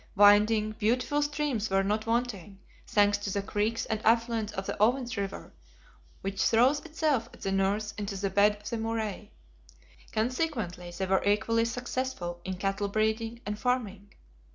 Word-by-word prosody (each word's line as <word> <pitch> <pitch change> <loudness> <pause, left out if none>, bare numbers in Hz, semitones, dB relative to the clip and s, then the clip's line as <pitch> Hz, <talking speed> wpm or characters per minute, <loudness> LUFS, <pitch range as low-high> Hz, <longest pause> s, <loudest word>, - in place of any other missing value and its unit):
Winding, 210 +2 +5
beautiful 250 +6 +1
streams 290 -7 -1
were 195 0 +2
not 215 +3 -1
wanting, 225 -5 -2 0.3
thanks 205 -1 +3
to 205 - -4
the 200 +1 -1
creeks 215 +2 -1
and 220 -1 -2
affluents 230 -1 +2
of 195 - -4
the - - -3
Oven's 240 +1 +2
River, 200 -2 -5 0.7
which 195 0 -3
throws 250 +6 +4
itself 300 -7 -1
at - - -20
the 195 - -2
north 195 +2 0
into 200 -1 -3
the 195 0 -2
bed 205 +2 +4
of 210 0 -12
the 230 - -2
Murray. 220 -2 -3 0.8
Consequently 225 - -2
they 175 +2 -3
were 190 0 +2
equally 220 +3 +2
successful 245 -7 -3
in 190 0 -4
cattle 195 +2 -1
breeding 220 +3 -1
and 210 0 -4
farming. 215 -6 -1
215 Hz, 155 wpm, -29 LUFS, 200-235 Hz, 0.8 s, Winding